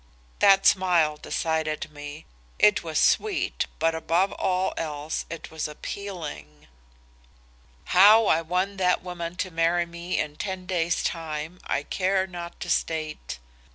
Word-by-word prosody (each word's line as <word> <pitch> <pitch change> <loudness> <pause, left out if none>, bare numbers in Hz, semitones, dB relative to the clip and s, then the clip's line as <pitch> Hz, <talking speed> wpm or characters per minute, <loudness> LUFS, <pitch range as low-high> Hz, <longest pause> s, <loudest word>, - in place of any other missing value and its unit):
That 195 -1 +6
smile 175 -5 +4
decided 155 0 -2
me. 145 +1 -9 0.3
It 210 -1 +5
was 160 -2 -1
sweet 430 -2 +1
but 165 0 +2
above 165 +4 +1
all 185 0 0
else 150 -1 -4
it 165 - -8
was 160 -1 -3
appealing. 150 - -7 1.2
"How 210 +5 +7
I 165 -4 +3
won 185 +4 -1
that 180 -1 +2
woman 175 -1 -5
to 185 0 -3
marry 165 +1 +2
me 170 +1 -4
in 150 -1 -2
ten 190 -2 -4
days 175 -2 0
time 160 +1 -4
I 140 - 0
care 190 +3 0
not 175 -2 -8
to 175 - -5
state. 155 - -2
170 Hz, 135 wpm, -26 LUFS, 155-185 Hz, 1.2 s, How